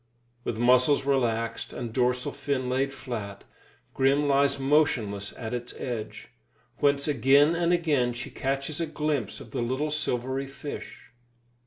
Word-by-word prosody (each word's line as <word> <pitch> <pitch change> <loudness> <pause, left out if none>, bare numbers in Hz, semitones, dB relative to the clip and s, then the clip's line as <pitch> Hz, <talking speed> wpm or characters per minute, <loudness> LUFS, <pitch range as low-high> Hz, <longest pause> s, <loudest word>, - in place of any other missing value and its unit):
With 110 - -3
muscles 125 +4 +4
relaxed 115 -4 0
and 115 -2 -5
dorsal 125 0 +1
fin 140 -2 -2
laid 135 +2 +1
flat, 115 -7 -6 0.5
Grim 140 +2 +2
lies 140 0 +3
motionless 120 -9 +1
at 115 -1 -5
its 120 0 -5
edge, 115 -4 -5 0.5
whence 140 0 +2
again 145 +3 +5
and 170 0 +1
again 150 -8 +2
she 120 +1 -7
catches 140 +4 -2
a 165 - -1
glimpse 150 -8 -2
of 110 - -12
the - - -2
little 130 +6 -1
silvery 135 -2 -1
fish. 140 +2 -8
135 Hz, 140 wpm, -27 LUFS, 120-145 Hz, 0.5 s, again